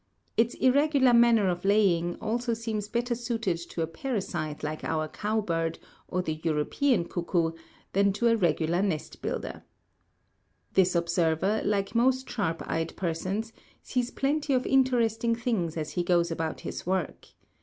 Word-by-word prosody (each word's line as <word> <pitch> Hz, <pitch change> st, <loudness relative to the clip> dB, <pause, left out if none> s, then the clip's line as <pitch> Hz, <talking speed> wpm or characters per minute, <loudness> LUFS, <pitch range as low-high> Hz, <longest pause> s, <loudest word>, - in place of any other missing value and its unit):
Its 230 Hz, +1 st, +2 dB
irregular 270 Hz, -1 st, +4 dB
manner 235 Hz, -3 st, +5 dB
of 175 Hz, -1 st, -1 dB
laying 190 Hz, -4 st, +3 dB
also 235 Hz, +1 st, -1 dB
seems 220 Hz, -2 st, -3 dB
better 240 Hz, +2 st, -1 dB
suited 225 Hz, -6 st, -1 dB
to 170 Hz, 0 st, -4 dB
a -, -, +1 dB
parasite 165 Hz, -, -4 dB
like 155 Hz, +1 st, -4 dB
our 155 Hz, -1 st, -1 dB
cow 215 Hz, +7 st, -1 dB
bird, 165 Hz, -4 st, -1 dB, 0.3 s
or 180 Hz, 0 st, -1 dB
the 155 Hz, -2 st, -4 dB
European 170 Hz, -, +1 dB
cuckoo, 170 Hz, -1 st, 0 dB, 0.4 s
than 200 Hz, +1 st, +4 dB
to 210 Hz, +5 st, +1 dB
a 230 Hz, -, +5 dB
regular 175 Hz, -3 st, +1 dB
nest 185 Hz, -7 st, -3 dB
builder. -, -, -4 dB, 1.1 s
This 185 Hz, -1 st, +3 dB
observer, 170 Hz, +4 st, +1 dB
like 200 Hz, -1 st, 0 dB
most 260 Hz, +2 st, +2 dB
sharp 165 Hz, -8 st, -2 dB
eyed 165 Hz, 0 st, -2 dB
persons, 190 Hz, +6 st, -2 dB, 0.3 s
sees 250 Hz, -2 st, -1 dB
plenty 285 Hz, +2 st, 0 dB
of 255 Hz, 0 st, +1 dB
interesting 235 Hz, -3 st, +2 dB
things 215 Hz, -9 st, -1 dB
as 155 Hz, -1 st, -3 dB
he 175 Hz, -, -1 dB
goes 175 Hz, -1 st, +2 dB
about 160 Hz, -1 st, -3 dB
his -, -, -5 dB
work. 185 Hz, -3 st, -2 dB
200 Hz, 150 wpm, -28 LUFS, 170-235 Hz, 1.1 s, manner